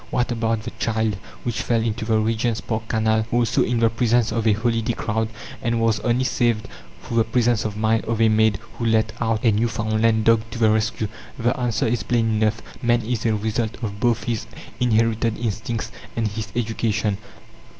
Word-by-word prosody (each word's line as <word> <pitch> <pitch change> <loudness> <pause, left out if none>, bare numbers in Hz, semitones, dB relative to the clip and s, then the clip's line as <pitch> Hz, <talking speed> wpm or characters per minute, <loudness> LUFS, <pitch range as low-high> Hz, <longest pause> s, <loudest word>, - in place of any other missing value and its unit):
"What 125 0 0
about 115 -1 0
the 120 - -5
child 110 -3 0 0.3
which 120 -2 -2
fell 115 -2 +1
into 110 0 -2
the 110 0 +2
Regent's 115 +1 0
Park 110 -1 -3
Canal 110 0 +1
also 120 0 +2
in 120 - +1
the 115 - +5
presence 115 0 +2
of 115 0 0
a 110 - +5
holiday 115 +1 0
crowd 110 0 -1 0.3
and 115 0 0
was 115 -1 +2
only 120 +1 +1
saved 120 -4 +1 0.4
through 115 - -3
the 115 - +5
presence 120 -1 +1
of 105 -1 -3
mind 110 +1 +1
of 115 0 -1
a 115 - +5
maid 110 -2 +3 0.2
who 120 - -1
let 110 -1 +2
out 115 0 0
a 115 - +6
Newfoundland 110 0 +1
dog 115 -1 +5
to 115 - -7
the 110 -2 +4
rescue?" 110 0 0 0.3
The 120 +1 +1
answer 120 -3 0
is 115 -1 0
plain 115 +1 +1
enough. 110 +1 +1 0.2
Man 120 -1 +2
is 115 0 -1
a 110 - +2
result 110 +1 -2
of 100 -2 -4
both 120 -1 +1
his 115 -4 -2 0.3
inherited 115 -1 +2
instincts 115 0 -3 0.2
and 115 -2 0
his 105 +1 -5
education. 110 -3 0
115 Hz, 190 wpm, -22 LUFS, 110-115 Hz, 0.4 s, a